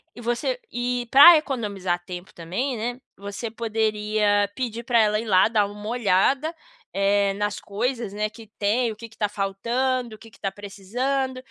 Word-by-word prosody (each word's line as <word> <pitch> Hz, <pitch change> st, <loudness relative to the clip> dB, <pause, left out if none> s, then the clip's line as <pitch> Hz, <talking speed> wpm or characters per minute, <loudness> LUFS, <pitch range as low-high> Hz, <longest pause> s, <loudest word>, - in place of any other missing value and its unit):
e 240 Hz, -, -10 dB
você 240 Hz, -, -1 dB
eh, 245 Hz, 0 st, -1 dB
pra 315 Hz, +5 st, +10 dB
economizar 200 Hz, -, -2 dB
tempo 180 Hz, +1 st, -8 dB
também, 190 Hz, +11 st, -3 dB
né, 240 Hz, +3 st, -4 dB, 0.2 s
você 200 Hz, +3 st, -6 dB
poderia 215 Hz, -2 st, +1 dB
pedir 235 Hz, -3 st, -3 dB
pra 240 Hz, -2 st, +2 dB
ela 210 Hz, -1 st, +3 dB
ir 225 Hz, -, -5 dB
lá, 190 Hz, -3 st, +5 dB
dar 210 Hz, -3 st, +2 dB
uma 205 Hz, +1 st, -9 dB
olhada, 245 Hz, -, +2 dB, 0.4 s
eh, 200 Hz, 0 st, +2 dB
nas 205 Hz, -1 st, -2 dB
coisas, 230 Hz, +1 st, -3 dB
né, 210 Hz, +1 st, -1 dB
que 220 Hz, +1 st, -13 dB
tem, 225 Hz, +4 st, +1 dB
o -, -, -8 dB
que 230 Hz, +2 st, -9 dB
que 225 Hz, -, -20 dB
tá 210 Hz, -, 0 dB
faltando, 235 Hz, +5 st, -1 dB
o -, -, -15 dB
que 225 Hz, 0 st, -15 dB
que -, -, -20 dB
tá 195 Hz, -, -2 dB
precisando. 245 Hz, +7 st, -3 dB
215 Hz, 175 wpm, -24 LUFS, 200-245 Hz, 0.4 s, pra